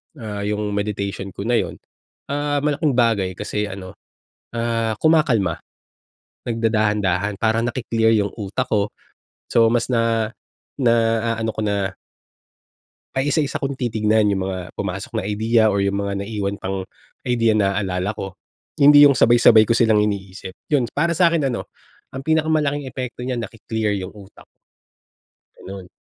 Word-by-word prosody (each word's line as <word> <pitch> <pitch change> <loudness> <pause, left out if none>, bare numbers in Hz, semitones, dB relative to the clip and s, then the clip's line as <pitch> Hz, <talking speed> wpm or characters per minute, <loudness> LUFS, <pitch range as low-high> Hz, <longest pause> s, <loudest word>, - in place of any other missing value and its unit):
ah, 105 -5 -6
yung 105 0 -2
meditation 100 -2 -3
ko 100 - -5
na 120 +1 +2
yun, - - -3 0.6
ah, 145 0 0
malaking 150 -1 +1
bagay 110 -6 +2
kasi 105 +3 -3
ano, 95 -2 -8 0.6
ah, 115 -1 -1
kumakalma. 125 - +3 0.9
Nagdadahan-dahan 105 -4 0
para 110 0 +2
naki-clear 115 -2 +1
yung 100 -2 0
utak 100 -1 -2
ko. 105 -1 +2 0.6
So, 115 -1 +5
mas 120 0 +1
na 115 -1 +1 0.5
naaano 115 -1 +1
ko 110 - -3
na. 100 -2 -1 1.2
Ay, 135 +2 +1
isa-isa 150 -3 0
kung 140 -1 -3
titignan 110 -4 +1
yung 95 -2 -1
mga 95 -2 -5
pumasok - - -4
na - - -2
idea 110 +2 +2
or 100 - +1
yung 100 0 0
mga 100 0 -2
naiwan 100 -1 -3
pang 95 0 -3 0.4
idea 115 -3 +2
naaalala 100 -1 0
ko. 95 -3 -7 0.4
Hindi 145 +1 +8
yung 140 -3 +6
sabay-sabay 115 -2 +6
ko 115 - +2
silang 115 -2 +3
iniisip, 95 -2 -5 0.2
yun. 140 -5 +2
Para 170 +3 0
sa'kin 170 -3 +3
ano 120 - -4 0.5
ang 135 - -5
pinakamalaking 155 -2 +1
epekto 125 0 -6
niya 125 -1 -2
naki-clear 110 -1 -3
yung 95 0 -6
utak. 100 -1 -15 1.1
Ganon. 95 -1 -9
110 Hz, 140 wpm, -21 LUFS, 100-120 Hz, 1.2 s, Hindi